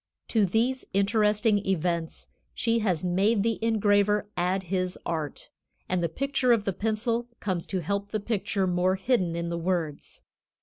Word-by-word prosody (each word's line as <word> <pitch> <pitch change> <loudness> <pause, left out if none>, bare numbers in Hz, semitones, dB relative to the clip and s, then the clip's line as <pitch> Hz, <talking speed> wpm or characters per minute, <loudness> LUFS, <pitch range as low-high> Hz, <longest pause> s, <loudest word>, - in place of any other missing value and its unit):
To 215 -4 +3
these 240 +7 +1
interesting 210 +1 +3
events 170 -3 -1 0.3
she 230 -1 +1
has 185 -6 0
made 200 +4 +2
the 225 0 -1
engraver 210 -2 +2
add 185 +2 0
his 185 0 -2
art, 155 -4 -4 0.4
and 185 -1 0
the 170 - 0
picture 265 - 0
of 230 -3 +4
the 195 - -1
pencil 225 +4 -1
comes 185 -4 -2
to 190 -2 -2
help 200 +4 -2
the 215 - -1
picture 200 -2 -1
more 180 +1 +2
hidden 190 -4 0
in 170 0 -2
the 170 0 -2
words. 165 -4 -3
200 Hz, 160 wpm, -27 LUFS, 180-220 Hz, 0.4 s, of